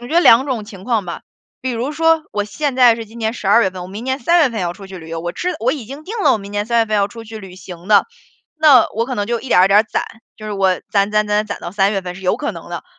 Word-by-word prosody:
我 240 - -9
觉 315 - -5
得 345 - +6
2 260 -2 +6
种 240 -6 -3
情 195 -3 -12
况 230 -5 0
吧。 170 - -7 0.4
比 260 - -3
如 240 +5 -2
说， 325 +1 +2
我 205 -1 -2
现 280 +5 -3
在 245 -3 +6
是 225 0 -7
今 225 +2 -14
年 220 0 -1
12 225 0 +3
月 190 - +1
份， 185 -1 -8
我 180 - -8
明 210 +5 -7
年 260 +1 -2
3 340 +8 +3
月 280 - +4
份 225 -4 -4
要 175 -1 -2
出 195 +2 -12
去 190 -1 -10
旅 160 -2 -11
游， 165 0 -4
我 175 0 -4
知 360 +1 -2
我 245 +4 +1
已 275 -7 -6
经 280 +4 -9
定 440 +5 -6
了 - - +5
我 - - 0
明 200 0 -10
年 205 0 -1
3 235 +1 +1
月 225 - +3
份 215 - -2
要 200 0 +2
出 230 +1 -10
去 220 0 -9
旅 185 -2 -11
行 180 -1 -11
的， 210 -1 +5 0.5
那 300 -7 +6
我 230 +2 0
可 255 - -4
能 205 0 -1
就 235 -1 -1
一 265 - -9
点 180 - +4
儿 185 - +7
一 - - +3
点 205 +2 +6
儿 - - +1
攒， 220 - -2 0.3
就 215 - -9
是 210 - -4
我 190 -2 +1
攒 200 0 +2
攒 210 0 +1
攒 210 +1 +1
攒 - - -15
攒 200 - -5
到 175 - -7
3 200 0 +2
月 195 - -1
份 180 -1 -7
是 190 - -11
有 185 - +1
可 - - -3
能 - - -11
的。 - - -6
215 Hz, 340 characters per minute, -18 LUFS, 195-250 Hz, 0.5 s, 儿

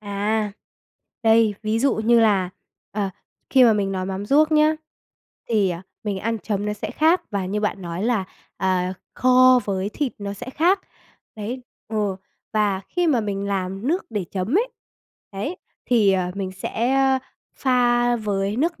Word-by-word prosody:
À. 210 +1 -1 0.7
Đây, 225 -2 +4
ví 215 +1 0
dụ 275 +3 +2
như 230 +2 +4
là, 200 -5 +3 0.4
ờ, 200 -2 -1 0.4
khi 260 -2 +6
mà 230 - +6
mình 200 -2 0
nói 185 -1 -2
mắm 195 +1 -4
ruốc 305 +6 +4
nhá, 305 0 +4 0.7
thì, 210 -5 +2
ờ, 170 -1 -4 0.2
mình 205 -2 -2
ăn 225 +3 -2
chấm 205 -1 -2
nó 210 - 0
sẽ 210 - -5
khác 325 +4 +3
và 200 -3 -2
như 210 +2 -2
bạn 200 -2 -2
nói 170 +1 -4
là, 225 -5 +1 0.3
à, 185 -1 0 0.2
kho 255 0 +6
với 195 -1 -1
thịt 280 +1 -2
nó 200 -1 -4
sẽ 205 +5 -7
khác. 350 +8 +2 0.6
Đấy, 235 +5 -5 0.3
ờ, 210 -3 -1 0.4
và 205 -3 +1
khi 355 -1 0
mà 260 -7 +3
mình 200 -1 -3
làm 195 +2 -2
nước 350 +5 0
để 210 -4 -2
chấm 195 +7 -2
ấy, 485 +3 0 0.6
đấy, 210 - -4 0.3
thì, 215 -5 +4
ờ, 180 -1 0
mình 190 -1 -4
sẽ 235 +7 -1 0.6
pha 245 -2 +3
với 205 -1 -1
nước 330 +5 0
215 Hz, 170 wpm, -23 LUFS, 195-250 Hz, 0.7 s, khi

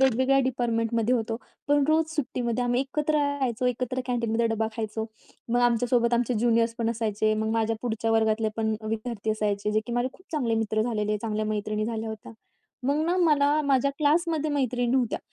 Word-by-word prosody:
वेगवेगळ्या 265 +1 +3
डिपार्टमेंटमध्ये 235 -1 0
होतो, 225 -1 -1 0.3
पण 290 -1 +4
रोज 315 0 +3
सुट्टीमध्ये 245 -4 -1
आम्ही 245 +1 +1
एकत्र 300 +3 -1
राहायचो, 275 -5 0
एकत्र 250 +1 -1
कॅन्टीनमध्ये 235 -2 0
डबा 225 0 0
खायचो. 220 0 -3 0.4
मग 245 +1 +2
आमच्या 240 0 +2
सोबत 235 -1 +3
आमचे 240 +1 +1
ज्युनियर्स 230 0 +2
पण 230 0 +1
असायचे, 215 -1 0
मग 220 0 -1
माझ्या 225 0 0
पुढच्या 225 -1 -1
वर्गातले 220 0 +2
पण 220 -1 0
विद्यार्थी 220 0 -3
असायचे, 210 -1 -1
जे 215 - +2
की 240 - -5
माझे 245 +1 +1
खूप 370 - -21
चांगले 250 -7 0
मित्र 220 -1 0
झालेले, 210 -2 -1
चांगल्या 215 0 -2
मैत्रिणी 215 0 -2
झाल्या 225 -1 -3
होत्या. 220 0 -8 0.5
मग 280 +1 +2
ना 350 +2 +1
मला 300 -4 +3
माझ्या 280 -1 +2
क्लासमध्ये 310 0 +1
मैत्रिणी 250 -4 0
नव्हत्या, 250 -4 +1
235 Hz, 175 wpm, -26 LUFS, 220-260 Hz, 0.5 s, पण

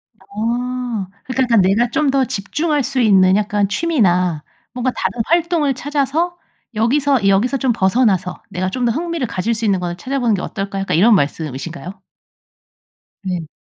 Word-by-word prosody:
아 235 0 -3 0.2
그러니까 260 0 -1
약간 230 -5 +3
내가 210 +6 +2
좀 300 +5 0
더 270 0 +2
집중할 280 +6 -1
수 265 0 -2
있는 190 -4 +5
약간 205 -1 +1
취미나 185 - +1 0.3
뭔가 250 +1 -1
다른 235 - -2
활동을 335 -4 +1
찾아서 290 +6 -1 0.4
여기서 255 0 +2
여기서 210 +8 +2
좀 260 -1 +1
벗어나서 190 -3 +1
내가 185 +1 -2
좀 250 +5 -2
더 235 - +2
흥미를 335 -3 -2
가질 220 +1 -1
수 225 0 -3
있는 195 -3 +2
거를 175 -1 -3
찾아 275 +5 -3
보는 235 -4 +2
게 180 - -4
어떨까 195 -2 -4
약간 195 -4 -1
이런 220 +5 +6
말씀이신가요? 165 +4 -3 1.2
네. 180 -4 -3
230 Hz, 335 characters per minute, -18 LUFS, 190-265 Hz, 1.2 s, 이런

